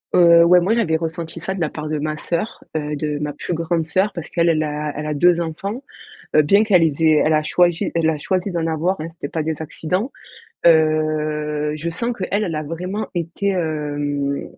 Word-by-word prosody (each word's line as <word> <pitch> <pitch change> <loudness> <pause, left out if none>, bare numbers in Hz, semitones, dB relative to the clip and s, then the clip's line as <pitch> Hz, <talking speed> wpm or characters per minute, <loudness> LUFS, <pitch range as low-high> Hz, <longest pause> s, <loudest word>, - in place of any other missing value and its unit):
Heu, 170 -1 +7
ouais, 180 +1 +6
moi, 190 +6 +1
j'avais 210 -9 +1
ressenti 165 +1 -5
ça 190 +3 -3
de 190 - -5
la 155 - +1
part 155 0 -6
de 155 -1 -2
ma 155 +1 -2
sœur, 170 +8 -3
heu, 150 -1 -2
de 150 0 -2
ma 150 0 -2
plus 160 - -4
grande 165 0 -1
sœur 190 +5 +1
parce 170 -2 -6
qu'elle 170 0 +2
elle 155 -1 +2
a 150 0 -3
elle 150 - -4
a 150 - -1
2 175 +4 +4
enfants, 195 - -4 0.5
heu, 155 - +7
bien 200 +8 +4
qu'elle 195 -6 +4
les 160 -1 +1
ait 155 -1 +5
elle 155 - +2
a 155 0 +3
choiji 175 +1 +2
elle 160 -1 +2
a 155 - -2
choisi 185 +5 -1
d'en 170 -2 -1
avoir, 165 +3 -1
hein, 155 - -4
c'était 145 - -6
pas 160 - -2
des 160 0 -1
accidents, 180 - -3 0.5
heu, 155 -2 +2
je 160 +2 -3
sens 235 +9 -2
qu'elle 200 +2 -1
elle 165 - -3
a 155 - -2
vraiment 180 +7 -4
été, 175 +3 -2
hem, 145 -5 -2
160 Hz, 220 wpm, -20 LUFS, 150-175 Hz, 0.5 s, Heu